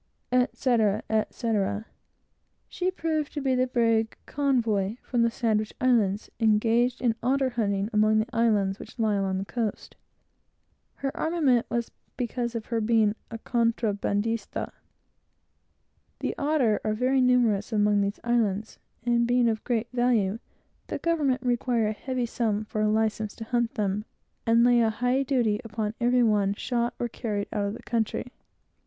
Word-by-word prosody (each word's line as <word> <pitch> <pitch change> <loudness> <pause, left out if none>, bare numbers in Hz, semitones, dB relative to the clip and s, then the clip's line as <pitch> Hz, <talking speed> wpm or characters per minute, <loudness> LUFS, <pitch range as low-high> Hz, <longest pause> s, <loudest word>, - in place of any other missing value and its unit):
etc., 235 -4 +2
etc. 215 -1 0 0.8
She 365 0 -1
proved 320 -5 -2
to 295 - -3
be 265 -2 +1
the 255 0 +2
brig 230 -2 +1
Convoy, 230 -8 0
from 245 -2 0
the 235 - +4
Sandwich 220 -3 -1
Islands, 225 -6 +2
engaged 230 +2 +2
in 240 -3 +2
otter 265 +1 +1
hunting, 200 -4 0
among 215 +1 +4
the 215 - +2
islands 210 -4 +2
which - - -11
lie 220 -2 +1
along 195 -1 0
the 195 - -3
coast. 225 -1 -4 1.0
Her 275 -1 -4
armament 295 -8 +1
was 235 -1 -2 0.3
from 240 -2 -2
her 230 0 -2
being 220 -1 +3 0.2
an 225 - -7
illegal 230 -1 +3
trader. 215 0 -2 1.5
The - - -3
otter 280 -8 +1
are 215 - 0
very 260 +3 +2
numerous 245 -5 +2
among 210 -1 +3
these 200 +1 -2
islands, 220 -3 0 0.3
and 235 -1 +2
being 245 0 +3
of 220 -1 -1
great 235 -1 -1
value, 230 -4 +1 0.5
the - - -3
government 290 -7 0
require 240 -2 +1
a 215 - -1
heavy 255 +3 -3
sum 220 -3 -1
for 215 0 -3
a 215 - +2
license 220 -1 0
to 225 - -7
hunt 240 0 -1
them, 205 0 -1 0.4
and 230 +1 +5
lay 240 -1 +5
a 225 - +3
high 245 +4 +1
duty 245 -5 +1
upon 215 -1 -3
every 245 +1 +3
one 205 -3 +2
shot 240 +1 -1
or 240 - -1
carried 210 -3 -4
out 205 -1 0
of 200 - -2
the - - -11
country. 235 +1 -2
230 Hz, 155 wpm, -27 LUFS, 215-245 Hz, 1.5 s, and